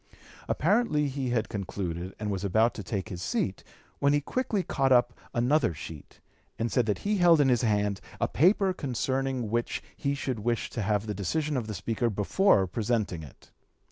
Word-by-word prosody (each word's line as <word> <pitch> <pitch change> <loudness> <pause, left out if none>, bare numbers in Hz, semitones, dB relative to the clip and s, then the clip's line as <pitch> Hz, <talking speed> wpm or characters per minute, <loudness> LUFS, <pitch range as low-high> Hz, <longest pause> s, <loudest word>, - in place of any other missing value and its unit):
Apparently 150 -12 +2
he 135 -1 -3
had 120 -3 0
concluded 95 -3 -4
and 105 -1 -3
was 95 -1 -3
about 110 +4 +3
to - - -6
take 100 +1 -4
his 90 -4 -6
seat, - - -2 0.4
when 140 +1 +3
he 145 - +4
quickly 210 - -1
caught 135 -5 0
up 120 -1 +4 0.2
another 120 - +2
sheet, 75 0 -10 0.4
and 115 +1 -1
said 125 -4 +2
that 105 - +1
he 210 0 +2
held 175 -3 +6
in 140 -2 +4
his 120 -2 +3
hand 105 -3 +1 0.2
a - - +2
paper 190 +5 +3
concerning 130 - -2
which 120 0 -1
he 140 0 -1
should 130 -4 -3
wish 115 +2 -1
to 115 - -3
have 105 +1 0
the 105 - -3
decision 145 - -1
of 120 -4 -2
the 105 - -4
Speaker 110 +5 -1
before 105 - +3
presenting 105 -3 -1
it. 75 -4 -14
120 Hz, 185 wpm, -28 LUFS, 105-140 Hz, 0.4 s, held